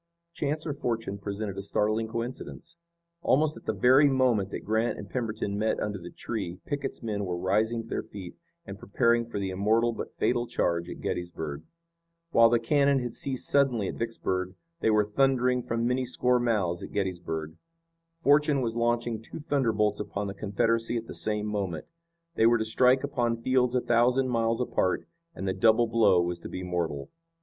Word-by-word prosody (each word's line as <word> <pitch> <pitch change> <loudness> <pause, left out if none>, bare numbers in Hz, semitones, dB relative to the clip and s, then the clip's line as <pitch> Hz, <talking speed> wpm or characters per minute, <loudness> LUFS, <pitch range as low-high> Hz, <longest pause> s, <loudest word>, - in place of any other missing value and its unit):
Chance 155 0 -2
or 150 - -2
fortune 115 -7 -3
presented 100 0 -4
a - - -3
startling 110 +3 0
coincidence. 120 +8 -6 0.5
Almost 155 +1 +2
at - - -13
the - - +1
very 135 +4 +5
moment 125 -7 +2
that - - -6
Grant 110 +2 0
and 100 - -8
Pemberton 110 -3 -3
met 110 +1 0
under 105 -2 -3
the 85 0 -9
tree 95 -6 -5
Pickett's 140 -3 -4
men 105 -3 -2
were 90 -2 -2
rising 110 +6 +1
to - - -14
their - - -2
feet 95 -4 -10 0.3
and 100 0 -8
preparing 115 +4 +1
for - - -4
the 95 -1 -2
immortal 110 +5 +2
but - - -7
fatal 120 -1 +1
charge 85 -3 -1
at - - -8
Gettysburg. 80 -4 -4 0.7
While 115 -5 +6
the 120 - +4
cannon 140 +4 +3
had 120 -3 -3
ceased 130 -2 -2
suddenly 125 -8 +2
at - - -4
Vicksburg 95 -5 -3 0.2
they 110 - +2
were 105 -1 +4
thundering 125 +2 +2
from 115 0 -2
many 125 +1 0
score 125 0 +2
mouths 100 -8 0
at - - -8
Gettysburg. 85 -5 -3 0.6
Fortune 150 -3 +3
was 115 -2 -2
launching 120 -1 0
two - - -9
thunderbolts 115 -9 +1
upon 105 0 -3
the 100 - -4
Confederacy 115 +4 0
at 115 - -4
the - - -8
same 105 -1 -1
moment. 100 -7 -3 0.5
They 115 - +4
were 120 0 +5
to 110 - -1
strike 125 +4 +3
upon 120 -4 -1
fields 130 -1 +2
a 125 - +3
thousand 125 +3 +2
miles 115 0 +1
apart, 95 -6 0 0.3
and 95 - -4
the 95 - +1
double 110 +4 +4
blow 105 -6 +4
was 85 0 -3
to - - -8
be 90 - -5
mortal. 85 -6 -3
115 Hz, 185 wpm, -28 LUFS, 100-125 Hz, 0.7 s, While